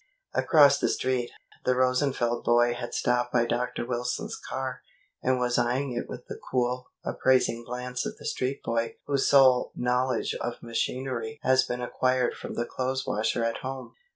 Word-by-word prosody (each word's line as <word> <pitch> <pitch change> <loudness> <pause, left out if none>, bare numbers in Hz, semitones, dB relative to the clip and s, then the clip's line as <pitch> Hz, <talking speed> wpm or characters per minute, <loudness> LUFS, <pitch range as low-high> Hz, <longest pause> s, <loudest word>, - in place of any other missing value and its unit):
Across 145 -4 +5
the - - +1
Street, 130 -2 0 0.3
the 125 - +2
Rosenfeld 125 -2 +1
boy 120 0 +4
had 120 - -5
stopped 125 0 +1
by 120 -1 +3
Dr. 120 0 -2
Wilson's 120 0 -2
car, 130 -1 -5 0.4
and 130 0 +2
was 125 0 +1
eyeing 125 +3 0
it 120 - -3
with 125 - -8
the - - -8
cool, 125 0 0 0.2
appraising 125 -3 +2
glance 125 +1 -4
of - - -7
the - - -12
street 130 +2 -2
boy 115 0 -1
whose 140 -2 +1
sole 130 -3 +5
knowledge 125 0 0
of 120 - -4
machinery 130 +4 -3
has 130 0 +5
been 125 -1 -3
acquired 130 0 +1
from - - -7
the 120 - -1
clothes 130 +2 -2
washer 110 +2 0
at 115 0 0
home. 130 0 -6
125 Hz, 165 wpm, -27 LUFS, 120-130 Hz, 0.4 s, Across